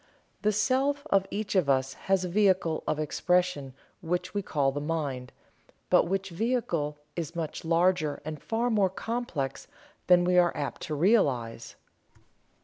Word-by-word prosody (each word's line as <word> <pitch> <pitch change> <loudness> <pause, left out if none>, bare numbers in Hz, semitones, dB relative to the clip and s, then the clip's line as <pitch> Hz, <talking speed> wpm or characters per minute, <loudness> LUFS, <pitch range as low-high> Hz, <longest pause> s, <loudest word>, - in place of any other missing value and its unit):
The 215 - +2
Self 270 +7 +1
of 195 -1 +3
each 210 0 -3
of 180 -7 +3
us 130 -1 +2 0.2
has 190 -1 +3
a - - -2
vehicle 185 -4 +2
of - - 0
expression 155 -3 0 0.3
which 175 +1 -2
we 205 - 0
call 140 -7 0
the 145 +1 -4
Mind, 145 -5 -3 0.6
but - - +5
which 195 +1 -2
vehicle 170 -8 -1 0.2
is 170 0 -4
much 165 -2 -4
larger 165 -2 +2
and 155 -2 -6
far 235 +2 -1
more 205 -4 +3
complex 190 - -4 0.4
than 180 -1 +6
we 180 0 +4
are 175 -1 +2
apt 140 - -4
to 155 - -1
realize. 135 - +1
175 Hz, 150 wpm, -28 LUFS, 150-200 Hz, 0.6 s, than